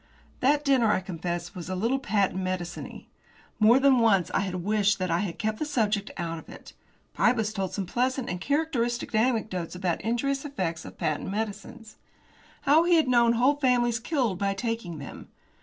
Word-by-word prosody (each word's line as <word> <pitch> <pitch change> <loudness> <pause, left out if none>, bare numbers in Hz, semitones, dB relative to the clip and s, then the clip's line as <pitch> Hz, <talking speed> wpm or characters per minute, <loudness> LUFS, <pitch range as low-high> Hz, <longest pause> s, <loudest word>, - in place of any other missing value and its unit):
That 290 +3 +2
dinner, 255 -6 +4
I - - +2
confess, 175 -1 -5
was 180 -2 -7
a 185 - -2
little 230 +8 0
patent 195 -5 0
mediciney. 185 -2 -5 0.5
More 225 +3 +6
than 270 -2 +5
once 200 -6 +3
I 195 - +1
rather 185 -1 -3
wished 205 +2 +1
that 185 -2 -2
I 170 - +2
had 185 -4 -3
kept 215 0 -2
the - - -1
subject 215 -8 0
out 165 -1 -3
of - - -15
it. - - -12 0.4
Pybus 220 -3 +1
told 195 -3 -2
some 195 - -3
pleasant 255 +6 -1
and 180 0 -4
characteristic 255 -5 -1
anecdotes 215 -7 0
about 180 -2 -1
injurious 270 +4 -1
effects 185 - -3
of - - -11
patent 155 +3 -2
medicines. 215 +2 -5 0.7
How 300 +4 +5
he 345 0 +4
had 315 -4 +3
known 235 -2 +4
whole 255 +5 +3
families 245 -4 +2
killed 240 - -1
by 195 0 0
taking 225 -6 -3
them. 140 - -9
215 Hz, 180 wpm, -27 LUFS, 185-250 Hz, 0.7 s, More